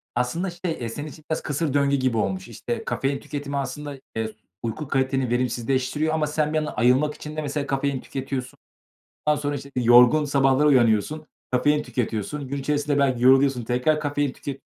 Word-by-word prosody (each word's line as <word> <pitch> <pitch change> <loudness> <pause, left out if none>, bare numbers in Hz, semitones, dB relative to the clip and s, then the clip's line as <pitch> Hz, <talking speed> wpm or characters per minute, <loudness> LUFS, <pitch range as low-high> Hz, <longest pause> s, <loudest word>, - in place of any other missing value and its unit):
Aslında 165 +10 -1
şey, 175 0 -4
eee, 120 -7 -4
senin 145 +6 -6
için 155 0 -12
biraz 160 - -1
kısır 145 -1 -2
döngü 140 -1 +3
gibi 130 -4 0
olmuş. 185 - -1
İşte, 235 -2 -5
kafein 135 +1 -1
tüketimi 145 -1 -5
aslında, 140 +1 -4 0.2
eee, 110 -1 -2 0.3
uyku 115 +6 -4
kaliteni 135 -1 0
verimsizleştiriyor 130 +5 0
ama 155 -1 +1
sen 150 0 0
bir - - +2
yandan 155 -1 -2
ayılmak 130 +5 +3
için 150 0 -8
de 155 - -2
mesela 145 -1 -3
kafein 135 -1 0
tüketiyorsun. 130 -2 -5 0.7
Ondan 150 -1 +2
sonra, 145 0 -1
işte, 140 0 -8
yorgun 125 +4 +6
sabahlara 135 0 +3
uyanıyorsun, 130 +3 +3 0.2
kafein 145 +4 +2
tüketiyorsun. 125 +3 -3
Gün 140 +2 -3
içerisinde 145 +1 0
belki 130 -3 +2
yoruluyorsun, 135 -1 +5
tekrar 125 +6 +1
kafein 145 -2 -1
tüket 135 +1 -7
140 Hz, 175 wpm, -24 LUFS, 130-150 Hz, 0.7 s, yorgun